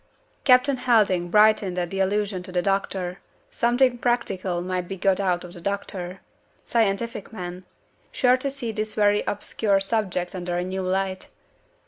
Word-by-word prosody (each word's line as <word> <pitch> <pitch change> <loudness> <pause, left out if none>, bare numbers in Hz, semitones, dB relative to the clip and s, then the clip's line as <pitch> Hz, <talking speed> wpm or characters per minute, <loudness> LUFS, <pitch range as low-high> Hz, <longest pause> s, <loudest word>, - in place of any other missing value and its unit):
Captain 255 +1 +5
Helding 205 -8 +2
brightened 210 -2 +4
at 175 -1 -2
the 195 - -3
allusion 200 0 0
to 180 - -8
the 180 -1 0
doctor. 190 -2 -1 0.3
Something 245 +1 +2
practical 195 -8 -1
might 180 -1 -2
be 195 - -5
got 190 +1 +2
out 180 -3 0
of 175 -1 -10
the 175 - -9
doctor. 190 -1 -4 0.4
Scientific 225 -1 -1
man. 180 -3 -7 0.5
Sure 250 -1 +4
to 275 +2 -2
see 270 -4 -4
this 215 0 -3
very 205 -1 +3
obscure 205 0 +1
subject 195 -4 -1
under 175 -1 -3
a 175 - 0
new 190 +1 -3
light. 190 0 -2
195 Hz, 155 wpm, -24 LUFS, 180-220 Hz, 0.5 s, Captain